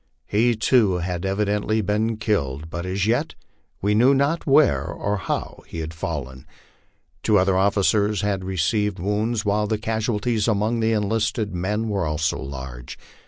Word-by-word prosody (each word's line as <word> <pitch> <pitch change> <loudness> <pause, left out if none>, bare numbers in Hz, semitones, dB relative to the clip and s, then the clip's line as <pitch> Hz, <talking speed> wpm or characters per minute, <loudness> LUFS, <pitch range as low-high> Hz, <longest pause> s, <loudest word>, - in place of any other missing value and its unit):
He, 115 +3 +2
too 110 -3 +3
had 90 +1 -3
evidently 105 +2 0
been 105 +3 0
killed, 80 - -2
but 85 +3 -4
as 95 +1 -1
yet 120 +8 0 0.5
we 105 +1 +2
knew 125 +6 +5
not 145 +5 0
where 145 +2 +4
or 105 +1 -2
how 90 - -4
he - - -8
had 80 0 -4
fallen. 70 -5 -5 0.7
Two 105 +2 +3
other 95 0 +3
officers 100 +1 +2
had 100 -2 -1
received 95 +3 0
wounds, 105 +4 -1
while 105 +1 +1
the 110 0 0
casualties 110 0 -1
among 110 +2 +1
the 110 0 +2
enlisted 105 0 0
men 105 +5 -1
were 100 -6 -1
also 75 0 -1
large. 65 -2 -7
105 Hz, 155 wpm, -23 LUFS, 90-110 Hz, 0.7 s, knew